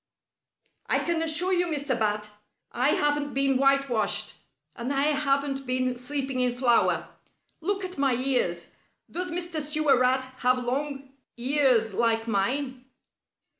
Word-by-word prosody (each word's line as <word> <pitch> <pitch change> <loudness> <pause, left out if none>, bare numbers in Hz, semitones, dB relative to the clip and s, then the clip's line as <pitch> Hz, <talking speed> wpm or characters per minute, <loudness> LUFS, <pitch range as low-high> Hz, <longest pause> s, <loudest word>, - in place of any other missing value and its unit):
"I - - +2
can 340 -1 -1
assure 325 +4 +1
you, 355 -1 +2
Mr. 290 -3 -3
Bat, 210 -1 -1 0.4
I 255 +4 +1
haven't 295 -1 0
been 275 -1 +2
whitewashed, 275 -5 +1 0.4
and 235 +3 -4
I 275 0 +1
haven't 275 -2 0
been 255 0 0
sleeping 265 +1 -3
in 250 -1 +2
flour. 245 -2 +2 0.5
Look 395 +3 -2
at 365 -4 -7
my 270 -3 +2
ears. 240 -10 -1 0.4
Does 360 +1 -3
Mr. 345 -2 -2
Sewer 300 -3 +2
Rat 255 +1 +2 0.2
have 255 0 +3
long 270 +2 -3 0.3
ears 250 -4 +2
like 225 +1 +1
mine?" 255 +5 -1
270 Hz, 130 wpm, -26 LUFS, 250-295 Hz, 0.5 s, have